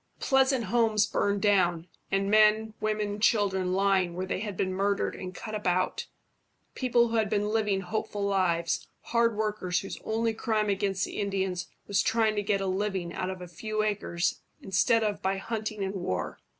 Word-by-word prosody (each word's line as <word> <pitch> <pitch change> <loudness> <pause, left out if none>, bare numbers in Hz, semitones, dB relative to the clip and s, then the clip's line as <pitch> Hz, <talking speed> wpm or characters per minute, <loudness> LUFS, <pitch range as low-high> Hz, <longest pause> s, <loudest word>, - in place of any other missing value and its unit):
Pleasant 265 -2 +3
homes 220 0 +2
burned 200 -1 0
down, 180 -5 +2 0.2
and 195 +1 0
men, 215 0 +4
women, 215 -1 0
and 205 +1 -5
children 190 -4 +2
lying 190 -2 +2
where 185 +1 -2
they 185 - -2
had 205 -3 -5
been 185 -1 0
murdered 200 +1 0
and 185 -1 -6
cut 215 - -7
about 195 - 0 0.7
people 240 -2 +2
who 230 - 0
had 215 -2 +1
been 210 0 0
living 210 -3 +1
hopeful 205 +1 -3
lives, 175 -4 0
hard 230 -1 +1
workers 210 -4 -1
whose 195 - -7
only 225 +1 0
crime 215 -1 0
against 195 -1 0
the - - -6
Indians 190 -3 -1 0.2
was 200 - +2
trying 220 -1 +2
to 205 - +1
get 200 -1 0
a - - -1
living 190 -2 -2
out 185 - -3
of 185 -1 -6
a - - -8
few 215 +5 -3
acres 200 -5 -1 0.2
instead 195 +4 +2
of 210 -2 -1
by 190 +1 0
hunting 215 -1 -4
and 190 0 -2
war. 135 - -3
205 Hz, 180 wpm, -28 LUFS, 190-215 Hz, 0.7 s, men